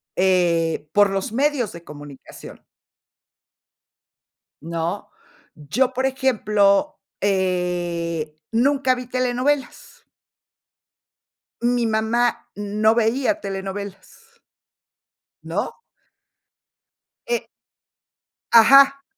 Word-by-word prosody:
eh, 170 -4 +1
por 205 -1 +5
los 195 +4 -3
medios 270 -4 0
de 170 0 -11
comunicación 145 -3 -12 2.0
¿no?, 165 +4 -4 0.5
yo, 245 - -1
por 260 +1 -1
ejemplo, 255 0 +1 0.2
eh, 175 -5 -2
nunca 260 +2 +2
vi 250 0 -7
telenovelas. 255 +3 -2 1.6
Mi 240 0 +1
mamá 225 +2 0
no 210 +2 +1
veía 250 +7 +1
telenovelas. 200 - -8 1.0
¿No? - - -3 1.5
Eh 480 0 -1 1.1
Ajá. 275 +4 +7
215 Hz, 70 wpm, -21 LUFS, 180-255 Hz, 2.0 s, Ajá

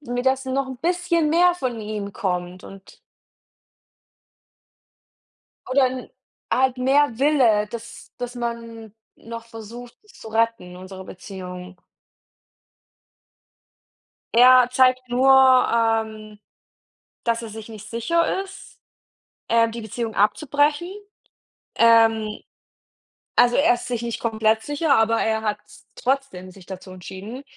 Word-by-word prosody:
mir 245 -3 -4
dass 265 0 +1
noch 265 +1 -1
'n 260 - -7
bisschen 340 -1 0
mehr 350 +2 +4
von 250 -8 -4
ihm 210 -1 -5
kommt 180 -1 -4
und 195 0 -14 2.7
Oder 260 0 +4
'n 255 0 -7 0.4
halt 260 0 +2
mehr 265 -1 +2
Wille, 250 -8 +3
dass 230 0 -10
dass 245 0 -5
man 230 -2 -6 0.2
noch 230 0 -9
versucht 230 +2 -10
zu 295 - -13
retten 225 -5 -1
unsere 185 +1 -10
Beziehung. 180 -1 -10 2.5
Er 250 +1 +7
zeigt 255 0 +2
nur, 255 +2 +2
ähm, 225 -5 +3 0.9
dass 230 0 0
er 230 - -7
sich 220 +1 -10
nicht 220 -1 -10
sicher 335 - 0
ist, 385 - -14 0.7
äh, 230 0 +3
die 230 +1 -7
Beziehung 220 +1 -5
abzubrechen. 290 - +1 0.9
Ähm, 225 -2 +3 0.9
also, 245 0 +4
er 280 -4 +4
ist 240 - -8
sich 240 -2 -3
nicht 235 -1 -4
komplett 220 -1 +1
sicher, 290 +3 +1
aber 225 +1 +2
er 220 0 0
hat 210 -1 -1
s 210 0 -19
trotzdem 255 -9 -3
sich 185 -1 -15
dazu 190 0 -9
entschieden. 195 +8 -9
230 Hz, 120 wpm, -22 LUFS, 215-260 Hz, 2.7 s, Er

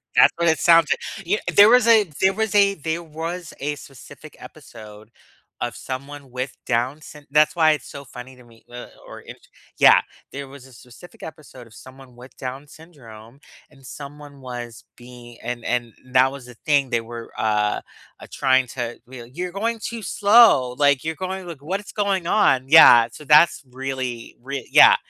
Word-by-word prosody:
That's - - +6
what 170 0 0
it 160 - +2
sounds 165 -2 +5
like. 195 -3 -5
You 210 +3 +1
kn - - -3
there 205 +2 +8
was 245 -1 +4
a 225 -2 +6 0.2
there 190 0 +3
was 220 0 -3
a 200 -1 +4
there 160 +2 -4
was 165 +2 -7
a 145 +2 -3
specific 135 -3 -14
episode 105 +1 -14 0.5
of - - -4
someone 140 0 -8
with 125 +2 -6
Down 125 +5 -1
syn 150 -1 -14
that's 150 +3 +3
why 160 -2 +4
it's 150 - -4
so 140 - -10
funny 125 +1 -12
to 125 - -18
me, 115 -1 -22
uh, 120 0 -10 0.2
or - - -11
immature - - -15 0.3
Yeah, - - +6 0.3
there 140 0 -7
was 135 -1 -14
a 130 - -19
specific 125 +9 -16
episode 140 -6 -12
of 110 - -20
someone 130 -1 -15
with 125 +2 -15
Down 135 +3 -7
syndrome, 130 -7 -16 0.3
and 135 -3 -21
someone 145 +1 -11
was 120 -2 -9
being 120 -1 -14
and 120 0 -6
and 120 -2 -2
that 130 +1 +2
was 140 -3 -11
the 125 - -14
thing, 140 -4 +1
they 120 - 0
were, 115 0 -10
uh, 105 -1 0 0.4
uh, - - -12
trying 130 -1 +1
to 120 -1 -6
w 120 -2 -12
"You're 180 +2 -5
going 225 +3 -3
too 230 +1 -6
slow, 200 - +4
like, 140 -2 +2
you're 160 0 -3
going, 190 0 -6
like, 160 -5 -9
what 185 +7 -4
it's 205 - -13
going 195 -4 -1
on?" 135 -12 +2
Yeah. 120 -7 +8
So, 150 - -12
that's 150 +1 +4
really 130 -2 -6
rea 135 -1 -7
yeah, - - +7
140 Hz, 190 wpm, -21 LUFS, 125-165 Hz, 0.5 s, there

